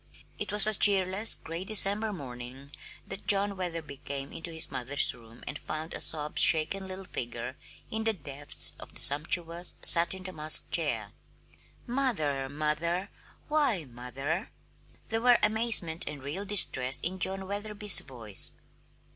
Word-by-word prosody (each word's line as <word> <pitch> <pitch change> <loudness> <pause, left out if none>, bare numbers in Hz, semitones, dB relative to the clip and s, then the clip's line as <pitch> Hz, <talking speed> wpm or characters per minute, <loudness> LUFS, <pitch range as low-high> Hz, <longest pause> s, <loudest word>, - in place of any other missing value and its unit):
It 205 -1 -4
was 210 0 +6
a 215 - +2
cheerless, 195 +1 +4
gray 165 +3 -8
December 210 +1 +2
morning 130 -4 -11 0.3
that 195 +1 -11
John 200 0 +3
Wetherby 165 -6 -6
came 140 -1 -8
into 165 +1 -6
his 160 -1 -2
mother's 135 +3 +3
room 115 -1 -18
and - - -7
found 155 +1 -7
a - - -5
sob 150 -1 -2
shaken 165 +5 +3
little 190 0 -8
figure 120 -3 -7 0.4
in 220 0 -3
the 225 - 0
depths 145 -5 -2
of - - -14
the - - -9
sumptuous, 165 +4 +3
satin 175 +2 +3
damask 155 -4 +3
chair. - - -1 0.7
"Mother, 155 - -3
mother, 155 +6 -4 0.4
why, 285 - -1
mother!" 135 - -7 0.6
There 225 0 -3
were 245 0 +4
amazement 210 -7 +1
and 145 -3 -10
real 165 +9 -6
distress 135 -10 +3
in 185 +2 -4
John 190 +2 -1
Wetherby's 205 0 +4
voice. 115 -7 +1
170 Hz, 140 wpm, -27 LUFS, 140-200 Hz, 0.7 s, was